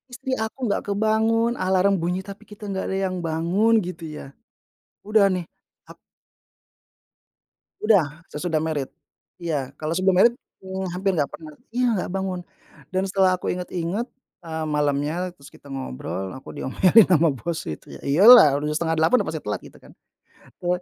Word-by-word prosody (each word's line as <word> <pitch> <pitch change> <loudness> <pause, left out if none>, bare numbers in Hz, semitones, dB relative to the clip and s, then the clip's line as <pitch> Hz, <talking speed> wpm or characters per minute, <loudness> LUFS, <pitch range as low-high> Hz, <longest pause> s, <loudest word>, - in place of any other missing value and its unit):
istri 265 +1 -5
aku 220 - -9
nggak 205 - 0
kebangun, 220 +3 +2
alarm 190 +1 +2
bunyi 180 +2 -1
tapi 200 0 -9
kita 210 +1 -12
nggak 190 -1 -3
ada 190 - -1
yang 185 - -4
bangun, 170 +8 +1
gitu, 180 -2 -7
ya. - - -9 0.8
Udah, 215 -1 +4
nih, 180 -2 -4 0.4
ak - - -13 1.8
Udah, 165 -7 +2
sesudah 160 +1 -2
married. 155 -4 -2 0.5
Iya, 150 -7 -3
kalau 155 +1 -2
sebelum 185 +1 +2
married, 235 +4 +5 0.3
eee, 190 0 -5
hampir 190 +1 0
nggak 145 -4 0
pernah 155 -2 -10 0.2
iya, 250 +1 +2
nggak 180 - -3
bangun, 190 -1 -2 0.5
dan 185 +1 +1
setelah 190 -1 +3
aku - - -3
ingat-ingat, 180 +4 -3 0.4
eee, 160 -1 -4
malamnya 150 +4 -1
terus 140 -5 -16
kita - - -20
ngobrol 95 - -5
aku 130 - -11
diomelin 190 +10 +4
ama 165 -4 +4
bos 165 +5 -4
itu, 75 - -8
ya, - - -18
iya, 140 +6 +2
lah, 220 - +10
udah 150 - -2
7.30, 160 +8 +2
pasti - - -4
telat, - - -4
gitu, - - -14
kan. - - -17 0.6
Te 175 - -7
180 Hz, 160 wpm, -23 LUFS, 155-195 Hz, 1.8 s, lah